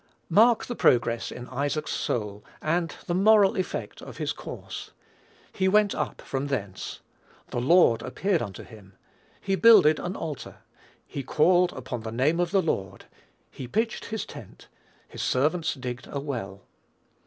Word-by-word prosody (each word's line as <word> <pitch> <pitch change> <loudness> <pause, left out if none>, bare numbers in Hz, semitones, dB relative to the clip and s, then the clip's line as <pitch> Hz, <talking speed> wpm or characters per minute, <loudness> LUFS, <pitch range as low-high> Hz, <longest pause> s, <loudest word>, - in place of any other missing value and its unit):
Mark 230 +2 +5
the 245 - -4
progress 120 - +2
in 125 0 -8
Isaac's 145 +3 -2
soul, 105 -3 -3 0.2
and 165 +1 -1
the 175 - -2
moral 205 +2 +5
effect 185 -3 -4
of - - -10
his - - -2
course. - - -8 0.6
"He 190 -2 +1
went 205 +1 +4
up - - -4
from 135 +1 -3
thence," 100 -9 -4 0.5
"the 120 - -1
Lord 130 -5 +5
appeared 190 -4 -1
unto 100 -6 -6
him," 100 -3 -15 0.5
"he 195 - -2
builded 190 -9 +6
an 180 - -4
altar," 150 -5 -7 0.4
"he 140 - -5
called 175 +6 +3
upon 125 -2 -6
the 110 0 -6
name 140 +8 +1
of 175 -1 +1
the 195 0 +2
Lord," 95 - -3 0.5
"he 130 - -8
pitched 225 - -1
his 220 -1 -4
tent," - - -12 0.4
"his - - -8
servants 155 +6 +1
digged 125 -2 -6
a 140 - -3
well." 115 -9 -5
150 Hz, 155 wpm, -26 LUFS, 120-185 Hz, 0.6 s, builded